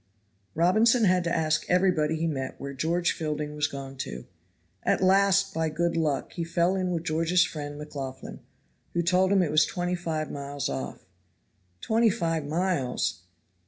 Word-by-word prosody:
Robinson 220 +8 +4
had 185 -3 +3
to 170 - 0
ask 155 -1 +1
everybody 180 -4 +2
he 160 +1 -1
met 135 -5 -3
where 140 0 -6
George 170 +5 0
Fielding 150 -1 -3
was 150 0 +1
gone 135 -1 -7
to. 65 - -6 0.6
At - - +1
last, 195 +1 +4
by 160 -1 0
good 170 +2 -1
luck, 155 -4 -1
he 170 - -3
fell 170 +2 +1
in 185 -1 -1
with 170 -2 -2
George's 165 +2 +2
friend, 145 -2 -6
McLaughlan, 135 -3 -7 0.6
who 170 - +2
told 185 +2 +3
him 195 -2 +4
it 155 - -1
was 155 +1 +5
twenty 175 0 -2
five 160 -3 -3
miles 140 0 -4
off. 65 -1 -5 0.8
"Twenty 225 +1 +3
five 165 -7 -1
miles? 145 - -1
165 Hz, 160 wpm, -27 LUFS, 150-180 Hz, 0.8 s, was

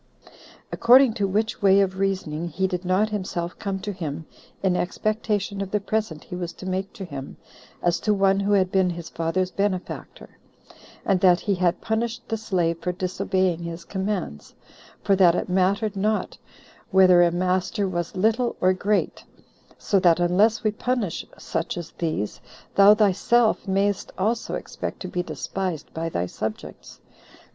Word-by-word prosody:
According 250 0 +6
to 205 -3 0
which 215 +3 -1
way 195 0 +5
of 190 -1 0
reasoning 180 -5 -1
he 190 +3 -1
did 180 -1 -2
not 185 +4 +2
himself 185 -4 -4
come 195 -2 -2
to 205 - -3
him 160 -3 -5 0.4
in 185 -2 +2
expectation 205 +1 -1
of 195 - -4
the 210 - 0
present 205 -6 -2
he 180 - -8
was 175 -1 -4
to - - -11
make 190 +1 -2
to 195 - -7
him, 140 -5 -8 0.5
as 175 0 +2
to 210 - 0
one 195 -1 +3
who 200 +1 +1
had 185 -2 +3
been 190 -1 +3
his 170 -1 -6
father's 180 +3 -1
benefactor; 195 -2 -4 0.7
and 195 -2 +2
that 180 -1 +4
he 205 - 0
had 180 -2 0
punished 225 +1 -2
the 225 - -1
slave 180 -6 -1
for 180 - -1
disobeying 185 -1 -1
his 170 0 -6
commands, 190 - -4 0.5
for 200 - +3
that 180 -3 +5
it - - -2
mattered 195 +3 +1
not 210 +2 -1 0.5
Whether 185 -2 +6
a 175 - +5
master 185 +4 0
was 175 -2 -3
little 225 +5 +1
or 185 0 +4
great: 200 +2 -1 0.5
so 200 - +1
that 175 -2 +4
unless 200 +7 +3
we 215 - +2
punish 220 -4 -2
such 165 - -3
as 170 -1 -6
these, 155 -11 -3 0.3
thou 200 +1 +7
thyself 215 +2 +2
mayst 195 +1 0
also 225 +5 -1
expect - - -6
to 185 - -4
be 180 0 -2
despised 180 -2 -4
by 165 +1 -3
thy 90 - -1
subjects." 110 +4 -7
190 Hz, 165 wpm, -24 LUFS, 175-205 Hz, 0.7 s, thou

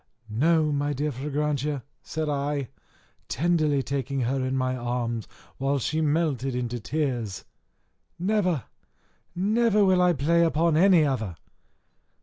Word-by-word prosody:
"No, 155 +4 +3
my 145 0 0
dear 145 +2 -1
Fragrantia," 145 0 -2 0.2
said 155 -1 -3
I, 145 -2 -1 0.6
tenderly 155 -2 +1
taking 135 0 -2
her 130 +2 0
in 130 +1 -1
my 130 0 0
arms 120 -2 -2 0.3
while 135 +1 0
she 155 +5 -1
melted 145 -5 0
into 120 -1 -2
tears; 120 -6 -2 0.7
"never, 180 - +1 0.7
never, 210 +2 +3
will 185 -1 +4
I 180 -1 +4
play 165 +4 +2
upon 165 0 +2
any 175 -1 +5
other 110 - -2
145 Hz, 125 wpm, -26 LUFS, 130-165 Hz, 0.7 s, any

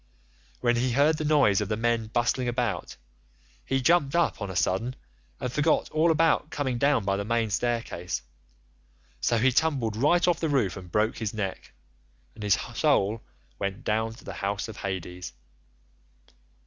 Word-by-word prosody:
When 120 -1 +2
he 125 0 +1
heard 150 +4 +3
the - - -1
noise 140 -10 +4
of 105 - -3
the 110 - 0
men 115 -1 0
bustling 120 +2 0
about, 120 -7 -2 0.7
he 135 - 0
jumped 150 0 +3
up 170 -8 +1
on 100 - -3
a 95 - -6
sudden 95 +8 0 0.4
and 125 - -3
forgot 150 +3 +1
all 155 +2 +3
about 160 -1 +2
coming 130 -6 -2
down 140 -6 +2
by 100 0 +1
the 100 - -2
main 115 0 0
staircase, 110 - -2 1.0
so 90 - +1
he 130 +4 +3
tumbled 130 -6 +1
right 170 +10 +3
off 175 -1 +2
the 160 - -1
roof 120 -11 +1
and 90 -2 -10
broke 110 +4 +1
his 110 -2 -3
neck, 95 -3 -4 0.6
and 110 - -13
his 105 -2 +3 0.2
soul 105 +3 +2 0.4
went 100 0 -3
down 110 +1 -1
to - - -15
the - - -6
house 100 +2 -3
of 110 - -9
Hades. 90 -4 -5
115 Hz, 170 wpm, -27 LUFS, 100-140 Hz, 1.0 s, noise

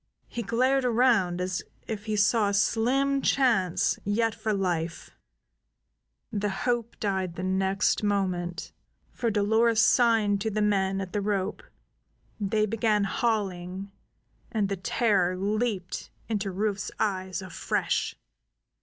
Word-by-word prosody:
He 235 - -4
glared 255 +4 +2
around 230 -8 +3
as 180 0 -2 0.2
if 215 -2 -5
he 215 -1 -1
saw 210 0 +3
a 200 - 0
slim 270 +6 +2
chance 225 -13 +2
yet 220 +2 +1
for 215 - -2
life; 175 -5 -2 1.2
the 205 0 0
hope 235 +3 -2
died 190 -4 -1
the 180 - -5
next 190 +1 +1
moment, 185 -4 -1 0.4
for 235 - -1
Dolores 220 +2 +3
signed 220 -3 +4
to 220 - 0
the 215 0 -2
men 195 -2 +1
at 185 -2 -6
the 205 - 0
rope, 200 0 -1 0.8
they 215 +1 +1
began 215 -1 +1
hauling, 195 -3 -2 0.6
and 210 -4 0
the 200 - -1
terror 185 -1 +1
leaped 205 -1 -2 0.2
into 205 -3 -1
Rufe's 205 +1 -2
eyes 190 -2 -1
afresh. 185 - -1
205 Hz, 125 wpm, -27 LUFS, 190-225 Hz, 1.2 s, signed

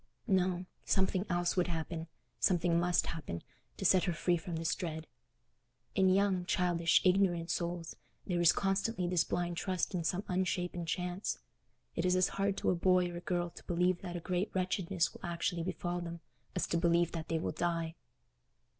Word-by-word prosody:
No, 185 -3 +1 0.2
something 190 0 +1
else 175 -1 +1
would 180 -2 +2
happen—something 170 +1 -1
must 175 0 +2
happen—to 85 - -7
set 185 -2 +5
her 175 - 0
free 175 +2 +2
from 170 0 -4
this 160 0 0
dread. 160 -4 -4 0.9
In 190 -1 +4
young, 190 -1 +3
childish, 175 -2 +3
ignorant 180 -3 +3
souls 170 -1 -3 0.3
there 175 -2 0
is 170 - +7
constantly 195 0 0
this 175 -1 +2
blind 175 -1 -2
trust 185 +1 -1
in 175 -2 -1
some 180 +4 0
unshapen 180 -2 -1
chance: 180 +3 -2 0.6
it 170 - 0
is 180 0 +3
as 185 0 +3
hard 195 0 0
to - - +2
a - - +1
boy 180 0 +3
or 175 - -5
girl 175 -1 -1
to - - -13
believe 180 +1 +1
that 175 -2 -5
a - - -2
great 180 +3 -1
wretchedness 185 -1 0
will - - -14
actually 170 0 -1
befall 175 +1 -2
them 170 -1 -6 0.3
as 180 - +1
to 170 - 0
believe 170 0 +3
that 165 -1 -5
they 165 - 0
will 160 - -1
die. 165 0 -1
175 Hz, 170 wpm, -33 LUFS, 170-185 Hz, 0.9 s, is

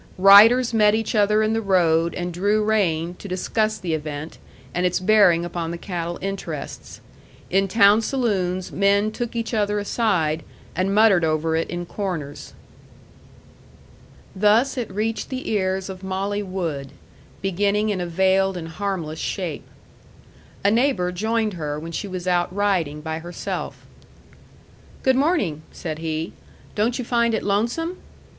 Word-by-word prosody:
Riders 220 +6 +7
met 210 -1 +4
each 220 -1 -2
other 210 0 +3
in 215 +1 +1
the 225 - 0
road 170 -4 +2
and 175 0 -4
drew 205 +4 +1
rein 175 -6 +1
to - - -8
discuss 215 +4 -1
the 170 -3 -3
event, 150 0 -5 0.3
and 175 - -1
its 180 -1 +1
bearing 185 -4 +4
upon 170 -1 -4
the 170 - -4
cattle 175 -2 -4
interests. 185 -6 -6 0.5
In 195 +2 +3
town 205 +1 +5
saloons 190 -8 -1
men 200 +2 +2
took 240 +1 -5
each 230 +1 -3
other 210 -1 +1
aside, 190 -7 0 0.3
and 190 +3 0
muttered 210 -5 +5
over 160 0 +1
it 165 - -1
in 175 0 -4
corners. 170 -7 -5 1.8
Thus 215 +8 +3
it 245 -4 -3
reached 220 +3 -2
the 260 0 -5
ears 190 -2 0
of 190 -1 -8
Molly 195 +2 -2
Wood, 165 -8 -4 0.5
beginning 200 +3 +1
in 195 -3 -1
a 175 - -3
veiled 190 +2 +2
and 165 -2 -6
harmless 165 -3 -4
shape. 180 -6 -4 1.0
A 200 - +5
neighbor 225 -7 +1
joined 220 +3 -1
her 150 -3 -4
when 165 +2 -7
she 200 - -4
was 185 -1 -6
out 175 -1 +1
riding 180 -7 0
by 160 +1 -4
herself. 175 +2 -6 1.2
"Good 260 -1 +4
morning," 265 - +1
said 155 -2 -6
he. 160 0 -3 0.4
"Don't 225 +4 0
you 250 - -4
find 235 -1 +2
it - - -3
lonesome?" 240 - -1
195 Hz, 150 wpm, -22 LUFS, 170-215 Hz, 1.8 s, Riders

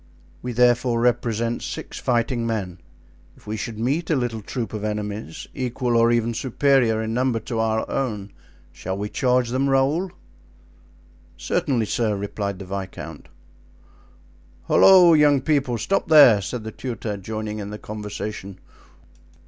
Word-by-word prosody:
We 125 - -4
therefore 120 0 +3
represent 115 -1 0
six - - -6
fighting 120 -1 0
men; 95 -6 -3 0.6
if - - -21
we 105 - -4
should 110 0 -5
meet 140 +9 -1
a 160 - +3
little 120 -4 -2
troop 115 +2 -5
of 105 -1 -4
enemies, 105 -4 -4
equal 125 -1 -2
or 115 0 +4
even 120 0 +1
superior 125 -2 +2
in 110 0 -3
number 125 -1 +1
to 115 - -4
our 110 0 0
own, 105 -7 -3 0.4
shall 95 +1 -5
we 105 +1 -4
charge 125 -1 +1
them, 130 +3 0
Raoul?" 140 +8 +1 1.3
"Certainly, 120 -5 0
sir," 110 -1 0
replied 100 0 -4
the 95 - -8
viscount. 95 0 -7 1.4
"Holloa! 180 -3 +7
young 145 -2 +5
people—stop 140 - 0
there!" 145 -10 +7
said 115 +4 -5
the 110 - -6
tutor, 115 -3 -5
joining 110 +2 -5
in 100 -1 -6
the 105 - -6
conversation. 105 -2 -6
115 Hz, 140 wpm, -23 LUFS, 105-130 Hz, 1.4 s, Holloa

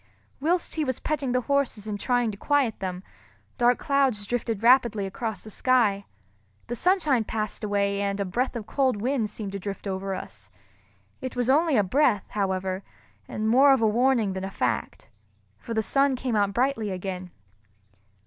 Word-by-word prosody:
Whilst 335 +5 0
he 315 - -1
was 260 -4 -2
petting 280 -4 -2
the 250 0 +1
horses 270 -5 0
and 210 -1 -4
trying 245 0 +1
to - - -8
quiet 270 +1 +1
them, 185 -1 -4 0.6
dark 245 0 +4
clouds 270 -8 +1
drifted 225 -1 -2
rapidly 235 -4 +4
across 210 +1 -4
the 215 - -10
sky. 215 -5 +2 0.6
The 240 - -4
sunshine 310 - +2
passed 215 -1 -4
away, 200 -1 0
and 200 0 -1
a 200 - 0
breath 245 +8 -1
of 225 -3 -5
cold 260 -3 0
wind 240 -1 0
seemed 205 -1 -6
to 200 - -5
drift 195 +1 -6
over 195 0 -3
us. 105 - -10 0.7
It 260 - -5
was 245 +1 +1
only 310 -1 +3
a 210 - +4
breath, 205 -1 +2
however, 190 -2 -1 0.5
and 215 +1 -3
more 270 +5 +6
of 265 - +1
a 220 - +4
warning 230 -2 +2
than 190 0 -5
a 195 - -3
fact, 125 -10 -3 0.5
for 230 - -6
the 220 - +1
sun 275 +4 +2
came 250 -2 -2
out 200 -1 +2
brightly 240 -1 0
again. 185 -1 -5
220 Hz, 175 wpm, -26 LUFS, 200-260 Hz, 0.7 s, more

